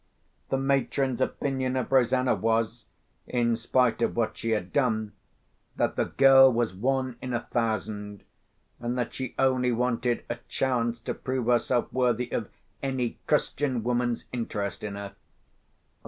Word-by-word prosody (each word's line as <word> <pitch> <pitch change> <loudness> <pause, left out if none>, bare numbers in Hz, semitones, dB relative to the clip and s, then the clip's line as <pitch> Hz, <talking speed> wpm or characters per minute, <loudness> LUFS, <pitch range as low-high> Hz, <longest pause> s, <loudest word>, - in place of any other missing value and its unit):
The 135 - +1
matron's 135 -1 0
opinion 130 -2 -1
of 130 0 -2
Rosanna 130 0 +3
was 115 0 0 0.4
(in 120 -2 +1
spite 120 +1 +1
of - - +1
what 115 -2 0
she 115 - -4
had 105 -5 -1
done) 110 -6 +1 0.6
that - - 0
the - - +1
girl 135 -1 +7
was 115 -3 0
one 130 +4 -1
in 125 -1 -3
a 120 - -1
thousand, 105 -3 -3 0.6
and 120 +1 -2
that 120 -2 -2
she 130 -2 -5
only 130 -2 +2
wanted 120 0 0
a 120 - -3
chance 120 -3 0
to - - -3
prove 130 -2 -3
herself 120 0 +1
worthy 125 -1 +1
of 110 - -2 0.3
any 130 -3 -2
Christian 130 -5 0
woman's 120 0 0
interest 105 -4 -3
in 105 -1 -4
her. 100 0 -7
120 Hz, 145 wpm, -27 LUFS, 115-130 Hz, 0.6 s, girl